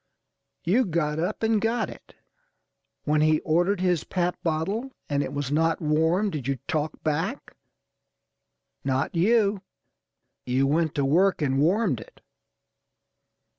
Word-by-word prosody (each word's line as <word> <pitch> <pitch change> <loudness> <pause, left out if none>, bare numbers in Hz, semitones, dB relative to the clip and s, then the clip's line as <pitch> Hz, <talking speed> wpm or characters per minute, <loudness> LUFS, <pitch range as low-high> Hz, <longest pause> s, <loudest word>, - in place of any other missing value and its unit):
You 215 +9 +3
got 155 -4 -1
up 185 +7 -2
and 220 -2 +2
got 230 +2 0
it. - - -13 0.9
When 150 0 +2
he 155 0 +4
ordered 175 +5 +1
his 180 -4 +1
pap 180 -1 -1
bottle 180 +10 -1 0.2
and 145 -1 0
it - - -3
was 145 -1 -3
not 165 +2 +2
warm, 160 +6 +1
did 140 -6 -5
you 140 -1 0
talk 155 -2 -2
back? 150 -2 -2 1.3
Not 135 +2 -1
you. 200 +2 +2 0.8
You 130 +2 +1
went 155 +2 +1
to 140 - +1
work 175 +4 +3
and 135 -1 +1
warmed 175 - +2
it. 110 - -14
160 Hz, 135 wpm, -25 LUFS, 150-190 Hz, 1.3 s, he